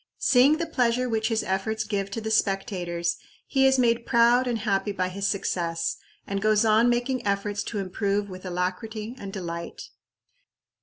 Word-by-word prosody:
Seeing 270 +4 +4
the 335 - -2
pleasure 250 -5 +1
which 220 -2 0
his 225 -2 0
efforts 215 +3 -1
give 200 -2 -2
to 215 - -4
the 220 0 -3
spectators, 185 -5 0 0.3
he 270 -1 +3
is 265 0 +4
made 235 -1 +2
proud 240 +2 +4
and 240 -2 0
happy 205 -2 0
by 185 -2 -1
his 195 +2 -2
success, 170 -4 -1 0.3
and 200 0 -3
goes 215 +1 +3
on 220 +2 +4
making 245 +2 0
efforts 200 0 -1
to 220 - -4
improve 200 +1 -1
with 185 -1 -9
alacrity 195 +5 -3
and 195 -1 -7
delight. 170 -3 -6
210 Hz, 165 wpm, -26 LUFS, 195-235 Hz, 0.3 s, Seeing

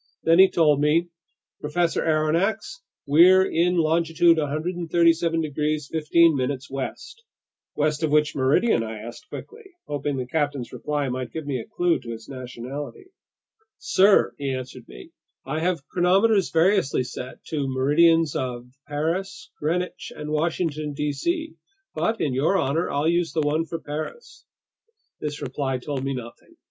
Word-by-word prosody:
Then 165 +2 +4
he 190 0 +8
told 150 -4 +3
me: 165 +4 +2 0.5
"Professor 165 +3 0
Aronnax, 165 - 0 0.2
we're 180 +6 +6
in 180 +1 +1
longitude 165 +1 +3
137 165 +2 +1
degrees 150 -1 -2
15' 155 -4 +3
west—" 285 - -6 0.5
"West 150 +1 0
of 160 - +1
which 150 0 +2
meridian?" 135 - +2
I 110 -1 -5
asked 120 - -10
quickly, 450 0 -10 0.2
hoping 145 -1 -3
the 130 - -3
captain's 145 -2 -2
reply 150 -2 -2
might 125 -1 -4
give 160 -2 -6
me 135 -3 -2
a 115 - -8
clue 175 -1 +1
to 120 - -11
his 115 -1 -7
nationality. 135 - -8 0.7
"Sir," 195 +2 +4
he 140 -1 -2
answered 130 -1 -6
me, 60 0 -12 0.3
"I 150 +4 -2
have 170 -4 -1
chronometers 195 +3 +3
variously 165 -5 +2
set 125 0 -8
to 155 -2 -2
the 135 - -1
meridians 150 +4 +3
of 125 -1 -4 0.2
Paris, 180 - -3
Greenwich, 175 +4 -2
and 150 0 -6
Washington, 155 -1 -1
D.C. 230 - -2 0.4
But 225 0 -1
in 140 - 0
your 150 +9 +2
honor, 160 +1 0
I'll 145 +2 0
use 170 0 +1
the 160 - +1
one 155 +2 0
for 165 - -5
Paris." 155 - -7 0.7
This 150 -1 -5
reply 135 0 -2
told 135 +1 -4
me 135 0 -2
nothing. 120 -2 -10
155 Hz, 145 wpm, -24 LUFS, 140-170 Hz, 0.7 s, he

